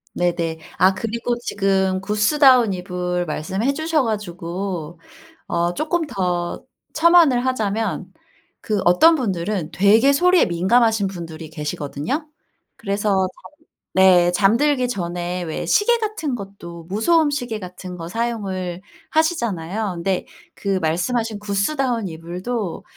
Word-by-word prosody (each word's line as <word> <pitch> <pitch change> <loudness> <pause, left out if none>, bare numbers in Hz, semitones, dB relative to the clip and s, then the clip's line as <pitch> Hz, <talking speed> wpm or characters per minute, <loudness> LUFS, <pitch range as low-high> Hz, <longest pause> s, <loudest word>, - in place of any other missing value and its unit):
네네. 170 -2 -1 0.2
아 185 +1 +5
그리고 230 +4 -2
지금 195 -4 0
구스다운 235 +4 +4
이불 180 -1 -3
말씀해 190 - -1
주셔 315 0 0
가지고 180 -5 -4 0.5
어 170 +1 0
쪼끔 320 - -1
더 180 -7 -2 0.3
첨언을 320 -7 +5
하자면 225 -4 -1 0.6
그 210 -2 -1
어떤 320 - +6
분들은 190 - -2
되게 220 +8 +5
소리에 360 +4 +4
민감하신 205 +4 +2
분들이 165 -4 -8
계시거든요. 150 - -4 0.5
그래서 205 0 -2
잠을 190 -1 +2 0.7
네 180 -2 +6
잠들기 245 +8 +2
전에 180 -4 -3
왜 160 -2 -4
시계 475 +3 +3
같은 420 - -3
것도 195 -5 -9
무소음 290 - +2
시계 245 -6 -3
같은 180 -1 -8
거 165 -1 -6
사용을 190 -5 -3 0.3
하시잖아요. 220 - -1
근데 180 +2 -2 0.3
그 195 -1 -1
말씀하신 215 +7 -1
구스다운 220 +3 -1
이불도 180 +5 -5
200 Hz, 270 characters per minute, -21 LUFS, 175-245 Hz, 0.7 s, 어떤